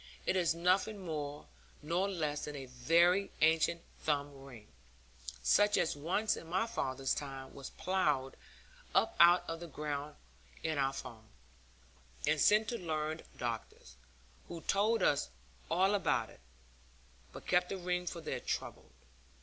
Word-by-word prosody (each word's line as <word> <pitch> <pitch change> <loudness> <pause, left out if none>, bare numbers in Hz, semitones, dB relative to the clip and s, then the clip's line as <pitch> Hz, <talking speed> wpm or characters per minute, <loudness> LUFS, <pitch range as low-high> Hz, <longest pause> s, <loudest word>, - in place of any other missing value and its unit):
It - - +1
is 170 -3 +2
nothing 185 +5 +2
more 150 -3 -4 0.4
nor 175 +6 0
less 155 -6 -2
than 150 - -6
a 135 -2 -6
very 170 +10 +3
ancient 160 +1 +3 0.2
thumb 145 -1 -1
ring, 120 -6 -12 0.8
such 205 0 +4
as 165 - +1
once 185 +9 0
in 165 - -9
my 185 +6 +1
father's 135 - -1
time 135 -2 -6
was 135 -1 -8
ploughed 150 -8 0 0.6
up - - +3
out 175 +1 +7
of 165 0 -4
the 170 - -7
ground 150 -1 -4 0.5
in 160 -2 -1
our 135 0 +2
farm, 115 -4 -9 1.0
and 155 -1 +2
sent 215 +1 +5
to 235 - -3
learned 155 -2 -3
doctors, 115 - -5 0.5
who 170 -1 -7
told 215 +6 +2
us 140 - +2 0.4
all 190 +4 +3
about 200 -4 +1
it, - - -17 0.9
but - - -11
kept 180 0 +2
the 195 - -3
ring 180 0 -2
for 170 0 -4
their - - -3
trouble. - - -4
160 Hz, 145 wpm, -34 LUFS, 145-180 Hz, 1.0 s, out